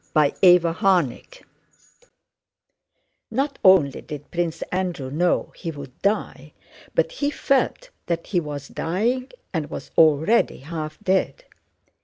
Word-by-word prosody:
CHAPTER 150 -2 +3 0.2
XVI 180 - 0 1.9
Not 275 +4 -2
only 180 -8 +5
did 145 -2 -9
Prince 170 -2 -2
Andrew 180 -8 -2
know 175 +4 0
he 170 - -6
would 140 -4 -9
die, 155 -8 -2 0.4
but - - +2
he 290 -13 -1
felt 295 - 0 0.2
that 170 -1 -2
he 180 - 0
was 145 -3 -6
dying 235 +10 -1 0.2
and 160 -4 -2
was - - -8
already 160 +8 +4
half 155 +1 -6
dead. 190 - 0
170 Hz, 115 wpm, -23 LUFS, 150-210 Hz, 1.9 s, only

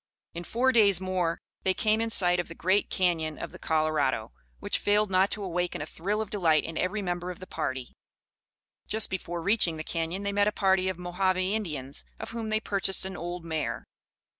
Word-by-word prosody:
In 170 +1 -6
four 255 +3 +2
days 205 -7 +5
more 185 -3 -1 0.2
they 190 0 +1
came 220 0 +2
in 230 - -1
sight 180 -4 +5
of 175 - -2
the 165 - -10
great 190 +5 +1
Cañon 165 -4 0
of - - -5
the - - -12
Colorado, 155 -2 0 0.3
which - - 0
failed 205 0 +2
not 190 +1 +4
to 210 - -3
awaken 180 -1 -2
a 145 - -3
thrill 200 +7 -2
of 215 - -5
delight 165 -7 +3
in 165 - -6
every 200 +5 -1
member 175 -1 -2
of 180 - -6
the 185 - -8
party. 130 -8 -4 0.9
Just 220 0 +1
before 175 -2 -4
reaching 190 -5 +3
the 155 - -4
Cañon 165 +4 -2
they 200 - 0
met 205 0 +3
a - - +3
party 190 -2 +2
of 185 - -3
Mohave 180 +1 0
Indians, 185 -9 -3 0.2
of - - -6
whom 230 -1 -4
they 215 0 +2
purchased 195 -3 +1
an 190 - -5
old 175 0 -5
mare. 160 -2 -3
185 Hz, 205 wpm, -28 LUFS, 165-205 Hz, 0.9 s, days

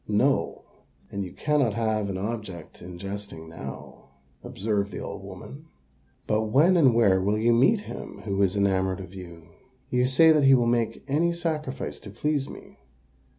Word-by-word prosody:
"No: 130 +7 +1 0.5
and 100 0 -3
you 90 - -7
cannot 145 -8 +1
have 110 -3 0
an 95 - -3
object 100 -5 -6
in 90 0 -9
jesting 100 -3 -7
now," 80 - -9 0.4
observed 100 0 -2
the - - -6
old - - -6
woman. 150 +4 -10 0.6
"But 110 +1 +1
when 150 - +4
and 135 -9 +5
where 100 -5 +4
will 100 +3 +1
you 115 +2 +3
meet 165 - +4
him - - -9
who 100 -1 -1
is 95 0 +2
enamoured 95 -1 +1
of 95 -1 -9
you?" 85 -3 -11 0.4
"You 125 0 +2
say 160 +5 +6
that 150 -3 +4
he 135 0 +7
will 120 -2 +2
make 120 -1 0
any 160 +5 +2
sacrifice 155 -5 -3
to 105 - -10
please 145 +6 -1
me?" - - -12
110 Hz, 170 wpm, -26 LUFS, 95-135 Hz, 0.6 s, he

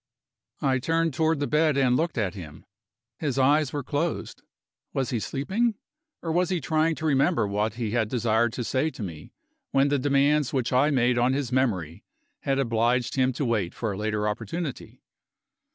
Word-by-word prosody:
I 130 -1 +2
turned 165 +3 0
toward 160 +1 +1
the 145 - 0
bed 150 -1 +2
and 130 -2 +3
looked 165 +2 -1
at 100 -5 0
him. 80 -6 -10 0.5
His 140 -4 -2
eyes 140 +1 +3
were 145 -2 -3
closed. 155 +5 -3 0.5
Was 130 -2 -1
he 120 - 0
sleeping? 200 - -1 0.5
Or 165 - -2
was 175 +2 +1
he 185 -2 0
trying 155 +3 +1
to 160 - -6
remember 135 -6 +2
what 105 +3 -1
he 115 -3 -3
had 110 -2 0
desired 115 -1 +1
to 125 - -3
say 130 +6 0
to 120 - -8
me, 80 -5 -8 0.4
when 135 +1 +3
the 145 -1 +1
demands 140 +1 +2
which 130 -2 0
I 130 +4 +4
made 125 -3 +2
on 125 +2 +3
his 135 -3 -2
memory 95 - -1 0.4
had 135 -1 -1
obliged 120 -1 +1
him 130 -1 +2
to 140 - -2
wait 105 -7 -1
for 110 -3 -2
a - - -4
later 105 0 -1
opportunity? 125 - -5
130 Hz, 185 wpm, -26 LUFS, 115-150 Hz, 0.5 s, I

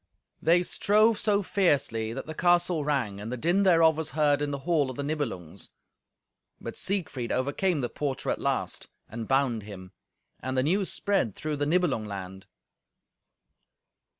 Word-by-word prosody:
They 170 +3 +4
strove 215 +4 +3
so 205 -1 +2
fiercely 140 - +1
that 135 +3 -5
the 155 - -6
castle 175 -1 +2
rang, 130 -9 -1
and 105 +3 -6
the 125 - -3
din 175 +10 +2
thereof 165 -4 +5
was 160 -1 -3
heard 145 -1 +3
in 145 - -1
the 140 - -3
hall 160 -6 +2
of 130 - -6
the 140 - -2
Nibelungs. 115 - -4 0.9
But - - -7
Siegfried 150 -11 -2
overcame 145 +5 0
the 120 - -1
porter 140 -3 -2
at - - -3
last, - - -2 0.2
and 115 0 -6
bound 135 -4 +1
him. 95 -3 -10 0.5
And 130 0 -3
the 130 - +3
news 185 +6 +1
spread 195 - 0
through 155 -1 -3
the 145 0 -1
Nibelung 155 -10 +1
land. 95 -1 -7
145 Hz, 160 wpm, -27 LUFS, 120-175 Hz, 0.9 s, thereof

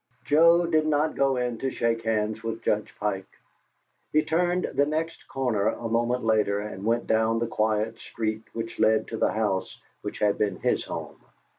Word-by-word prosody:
Joe 170 +3 +5
did 155 -2 +2
not 150 +1 +2
go 135 -1 +2
in 125 -2 -2
to 135 - -1
shake 115 -2 0
hands 110 0 0
with 115 0 -4
Judge 105 0 0
Pike. 95 -2 -2 0.8
He 155 0 +3
turned 175 +3 +1
the 145 - +2
next 160 +2 -3
corner 120 -6 0
a 115 - -2
moment 120 +2 0
later, 105 -2 +2
and 105 -2 -6
went 115 +2 +1
down 110 +1 +2
the 120 - 0
quiet 110 0 0
street 110 -1 -3
which 115 0 -6
led 110 0 +3
to 115 - -4
the - - +2
house 105 -4 -1 0.2
which - - -5
had 105 -1 +1
been 100 -3 +1
his - - 0
home. - - -7
115 Hz, 180 wpm, -26 LUFS, 110-135 Hz, 0.8 s, Joe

